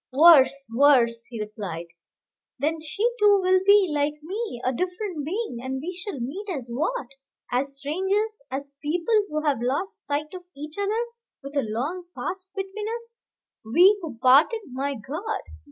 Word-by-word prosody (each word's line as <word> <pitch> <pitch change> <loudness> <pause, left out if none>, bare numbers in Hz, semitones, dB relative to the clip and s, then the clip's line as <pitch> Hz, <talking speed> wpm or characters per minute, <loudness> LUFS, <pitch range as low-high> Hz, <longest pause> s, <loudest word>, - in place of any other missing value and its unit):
"Worse, 275 -2 +6
worse!" 235 -4 +4
he 235 -2 -8
replied; 205 -5 -5 0.7
"then 310 +4 -1
she 310 +7 -4 0.2
too 410 -1 +6
will 370 0 +4
be, 400 0 +6
like 295 0 +1
me, 395 - -4
a 255 - +2
different 360 - -3
being, 360 - -3
and 260 +1 -3
we 350 +6 -5
shall 360 -5 -6
meet 345 - -5
as 260 -9 -4
what? 320 - -1 0.5
as 275 +3 -1
strangers, 385 +9 -1
as 275 +1 -5
people 335 +8 -1 0.2
who 305 0 -2
have 280 -5 +1
lost 380 - -2
sight 300 +2 -2
of 365 - -7 0.2
each 300 +2 -7
other, 430 +4 0 0.4
with 275 +1 -8
a 280 - +3
long 270 +12 -3
past 375 +1 -4
between 390 +2 -4
us, 465 0 -11 0.4
we 350 - +6
who 300 -9 -6
parted, 275 - +5
my 275 +2 -2
God! 315 - -4
305 Hz, 160 wpm, -25 LUFS, 265-385 Hz, 0.7 s, Worse